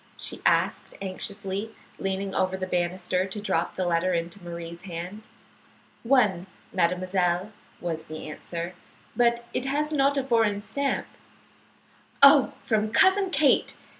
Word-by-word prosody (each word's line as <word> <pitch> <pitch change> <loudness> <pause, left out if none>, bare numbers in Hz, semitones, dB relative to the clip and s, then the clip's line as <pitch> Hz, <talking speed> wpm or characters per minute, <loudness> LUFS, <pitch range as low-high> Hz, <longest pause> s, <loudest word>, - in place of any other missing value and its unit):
she - - -3
asked, - - +1
anxiously, 200 +2 -5 0.2
leaning 195 0 -2
over 190 0 0
the 190 - -3
banister 180 +1 -1
to 195 +2 -6
drop 190 -5 -1
the 185 - -1
letter 175 +1 +1
into 170 +3 -4
Marie's 170 0 -7
hand. 185 +3 -7 0.7
"One, 215 -8 +2 0.3
mademoiselle," 180 +1 +1 0.3
was 165 -2 -4
the 155 0 -7
answer. 170 +3 -5 0.4
"But 235 -1 +2
it 255 - -1
has 300 +3 0
not 280 -1 +3
a 275 - +1
foreign 225 -5 +2
stamp." 280 +6 -1 1.2
"Oh, 280 -1 +8
from 215 -2 +1
Cousin 380 - +4
Kate!" 310 -6 +2
190 Hz, 130 wpm, -26 LUFS, 175-235 Hz, 1.2 s, Oh